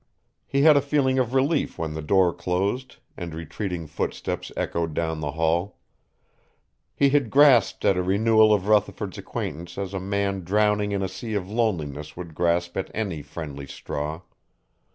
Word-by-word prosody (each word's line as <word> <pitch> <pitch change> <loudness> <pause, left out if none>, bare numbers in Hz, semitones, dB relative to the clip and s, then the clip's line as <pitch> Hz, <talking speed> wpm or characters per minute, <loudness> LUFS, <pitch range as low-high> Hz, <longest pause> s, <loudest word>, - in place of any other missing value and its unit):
He 140 0 +1
had 155 -1 +8
a 140 - +5
feeling 135 -2 +1
of 125 0 0
relief 140 +3 +1
when 80 -2 -3
the 80 - -4
door 90 +2 +3
closed 100 +9 -2 0.2
and 85 -3 -6
retreating 85 +1 -4
footsteps 75 - -4
echoed 85 -2 -2
down 80 -1 -1
the 75 -2 -3
hall. 80 +4 0 1.2
He 140 - +4
had 140 -5 +2
grasped 135 -6 +5
at 95 - +4
a - - +2
renewal 110 +4 +4
of 100 -3 +2
Rutherford's 105 -1 +1
acquaintance 85 +4 -5
as 100 -1 -4
a 95 - -2
man 100 0 -1
drowning 105 +2 +2
in 100 -1 -1
a - - 0
sea 105 +4 -5
of 95 -3 -2
loneliness 80 - -2
would 85 -2 -7
grasp 85 +1 0
at 95 - -2
any 95 -9 -2
friendly 70 -2 -7
straw. 75 +3 -5
95 Hz, 165 wpm, -25 LUFS, 80-110 Hz, 1.2 s, had